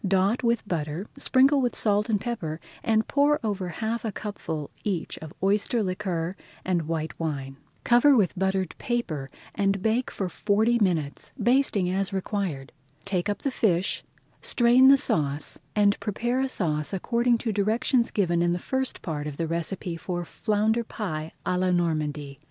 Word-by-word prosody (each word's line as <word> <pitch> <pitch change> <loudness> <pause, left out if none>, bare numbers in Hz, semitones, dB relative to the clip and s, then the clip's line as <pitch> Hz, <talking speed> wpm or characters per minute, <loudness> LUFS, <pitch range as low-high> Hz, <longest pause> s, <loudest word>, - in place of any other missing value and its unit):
Dot 195 +5 +2
with 235 -3 +1
butter, 160 0 -2
sprinkle 275 0 +4
with 245 -1 0
salt 210 0 +2
and 210 -2 +2
pepper, 175 -10 -4 0.2
and 220 -1 +2
pour 290 +1 +3
over 200 -4 -2
half 220 +6 -3
a 220 - -2
cupful 160 -8 -5
each 185 -6 -2
of 160 -1 -9
oyster 210 +3 +2
liquor 185 -3 -2 0.3
and 175 -4 0
white 160 -1 -3
wine. 135 -4 -3 0.3
Cover 250 +4 +6
with 195 -6 +2
buttered 190 -1 0
paper 165 - -2 0.2
and 195 -1 +1
bake 230 +3 +1
for 195 - -3
forty 215 +6 +2
minutes, 165 -8 -1
basting 240 -7 +2
as 190 +1 -1
required. 190 -8 -3 0.3
Take 195 0 -1
up 205 - -3
the 275 - 0
fish, 190 -7 +1 0.4
strain 245 +2 +5
the 275 +1 +8
sauce, 145 - 0 0.2
and 205 -1 +3
prepare 240 +4 -1
a 270 - 0
sauce 155 -7 -1
according 235 +5 +2
to 225 -1 -2
directions 225 +4 +1
given 175 -4 +1
in 175 0 +2
the - - 0
first 265 +8 -2
part 150 -3 -3
of 145 -2 -6
the 165 - -1
recipe 170 +1 -3
for 175 +1 -4
Flounder 220 +4 0
Pie 160 -9 -4
à 180 - +1
la 185 0 +2
Normandy. 155 -5 -1
195 Hz, 165 wpm, -26 LUFS, 165-230 Hz, 0.4 s, the